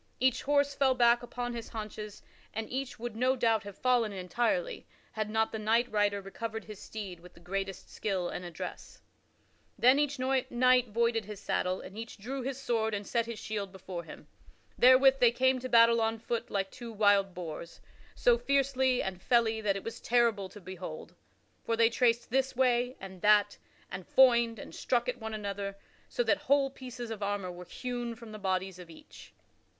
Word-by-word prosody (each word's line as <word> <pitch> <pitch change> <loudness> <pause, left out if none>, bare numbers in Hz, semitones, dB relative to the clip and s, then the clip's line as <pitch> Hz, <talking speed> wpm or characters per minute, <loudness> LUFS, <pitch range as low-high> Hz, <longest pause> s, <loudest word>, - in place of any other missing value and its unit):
Each 255 -1 +2
horse 285 0 +2
fell 270 -2 +2
back 240 -1 +4
upon 245 0 -4
his 230 -1 -6
haunches, 215 -1 -7 0.3
and 220 0 -3
each 265 +1 -3
would 235 -1 -6
no 255 +3 +2
doubt, 230 -3 +2
have 200 -1 -10
fallen 245 -4 +2
entirely, 240 - -1 0.2
had 215 -1 -3
not 220 +1 +1
the 220 - -4
knight 230 +3 +2
rider 205 -1 +1
recovered 220 +3 -5
his 215 -2 -10
steed 195 -5 -7
with 180 +1 -16
the - - -15
greatest 195 +2 -4
skill 190 -4 -2
and 180 - -5
address. 175 -2 -8 0.7
Then 255 +4 +5
each 290 -1 0
knight 255 -1 +2
voided 230 0 +1
his 210 -1 -8
saddle 185 -2 -1
and 195 - -11
each 225 +1 -7
drew 260 +6 -5
his 260 +1 -3
sword 225 -4 0
and 205 0 -5
set 230 +1 0
his 235 -2 -5
shield 205 -3 -4
before 185 -2 -7
him. - - -12 0.5
Therewith 265 +2 +6
they 240 -2 +6
came 260 +1 +2
to 255 +1 -6
battle 230 -1 +6
on 225 0 0
foot 230 +1 -3
like 195 -1 -2
two 240 -2 -8
wild 205 -3 +3
boars 170 -1 -7 0.4
so 485 -1 +4
fiercely 265 -2 +2
and 190 -2 -5
felly 225 -2 +2
that 200 -2 +1
it 195 - -5
was 230 - -7
terrible 230 -5 +2
to 210 - -12
behold. 180 -4 -8 0.5
For 230 - -1
they 230 0 +5
traced 235 0 +1
this 265 +1 +1
way 250 0 +2
and 190 -2 -10
that 205 -1 +4 0.3
and 185 0 -5
foined 235 -3 +5
and - - -10
struck 240 -1 0
at 250 0 -2
one 220 -1 -5
another 200 -1 -4 0.3
so - - 0
that - - +2
whole 280 -1 +4
pieces 250 -3 -8
of 215 -2 -6
armor 200 -2 -2
were 180 0 -10
hewn 240 +2 -4
from 230 -1 -11
the 215 - -8
bodies 190 -1 -2
of 175 -2 -11
each. 160 - -14
225 Hz, 190 wpm, -30 LUFS, 200-250 Hz, 0.7 s, Therewith